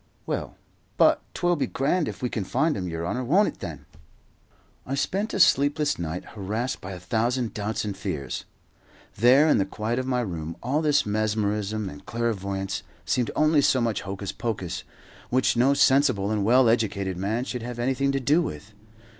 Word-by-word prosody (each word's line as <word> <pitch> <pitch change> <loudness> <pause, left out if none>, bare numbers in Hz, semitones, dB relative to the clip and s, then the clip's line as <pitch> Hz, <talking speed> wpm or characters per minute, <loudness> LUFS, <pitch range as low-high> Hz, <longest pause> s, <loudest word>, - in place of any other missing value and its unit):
Well, - - -4 0.4
but - - +5
'twill 175 0 +2
be 145 - -1
grand 150 +5 0
if - - -6
we 125 - +1
can 110 - -2
find 155 - +1
'im, 95 -2 -3
yer 85 -1 -4
honour, 125 +8 -2
won't 185 - +3
it - - -12
then?" - - -7 1.0
I 135 - -3
spent 195 +10 -1
a - - -2
sleepless 145 - +3
night, 85 +1 -4
harassed 110 +5 -3
by 95 +1 -6
a 90 - -7
thousand 120 +5 -1
doubts 105 +1 -2
and 100 -2 -3
fears. 75 -9 -4 0.7
There, 130 +8 +6
in 150 - +4
the - - +3
quiet 110 +5 -2
of 130 - -3
my 125 -1 +1
room, 85 -6 -5
all 140 +6 +1
this 150 -2 +3
mesmerism 105 0 -1
and 75 -4 -9
clairvoyance 100 -4 -2 0.2
seemed 125 -2 0
only 155 -1 +4
so 130 - +3
much 115 -4 0
hocus 95 0 -5
pocus, 95 -6 -4 0.5
which 130 0 +2
no 130 +4 +4
sensible 130 -8 +3
and 105 -2 0
well 125 +4 +5
educated 100 -5 +1
man 105 +7 -1
should 125 -3 -4
have 120 +1 -6
anything 135 +3 +1
to 135 - 0
do 145 +6 +3
with. 100 - -6
115 Hz, 180 wpm, -25 LUFS, 100-135 Hz, 1.0 s, There